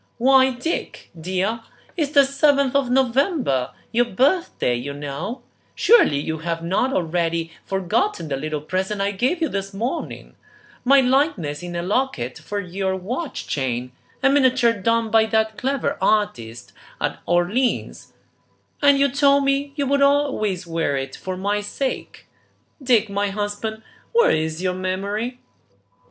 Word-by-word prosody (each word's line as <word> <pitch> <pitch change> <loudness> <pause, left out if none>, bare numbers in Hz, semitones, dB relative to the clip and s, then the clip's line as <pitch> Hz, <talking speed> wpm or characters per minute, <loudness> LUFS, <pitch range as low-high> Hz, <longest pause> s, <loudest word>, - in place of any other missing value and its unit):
"Why, 260 +2 +5
Dick, 320 +7 -4
dear, 185 +7 -2 0.4
it's 300 -6 -1
the 280 -1 +7
seventh 280 -1 +2
of 275 -3 +2
November, 255 - +1 0.2
your 240 +2 +3
birthday, 265 - +1
you 125 +4 -4
know; 150 - -5 0.3
surely 430 - +5
you 160 +2 -3
have 165 0 -3
not 195 +10 +1
already 165 -3 -1 0.2
forgotten 195 - -1
the 140 - -2
little 150 +2 -4
present 190 +6 -2
I 200 +1 +1
gave 260 - 0
you - - +2
this 195 -4 -4
morning, 240 - -4 0.5
my 275 +2 +6
likeness 250 - +1
in 175 0 -6
a 170 - -2
locket 185 - -1
for 205 - -4
your 190 0 -2
watch 245 - -5
chain, 125 -2 -2 0.3
a 270 - +5
miniature 260 -4 +4
done 230 +2 0
by 220 0 +4
that 220 0 +1
clever 270 +2 -2
artist 120 - -1 0.3
at - - -2
Orleans, 185 +9 0 0.7
and 285 -1 +5
you 280 0 +4
told 280 +1 +3
me 275 +1 0
you 285 -2 -1
would 280 +1 +1
always 275 -10 +1
wear 165 -4 -1
it 135 0 -5
for 185 -1 -5
my 205 +2 -1
sake. 260 +6 -4 0.6
Dick, 240 -5 +3
my 200 0 -1
husband, 210 +2 -4 0.3
where 470 0 +5
is 160 +2 -1
your 185 -1 +1
memory?" 200 +6 -3
210 Hz, 145 wpm, -22 LUFS, 175-265 Hz, 0.7 s, the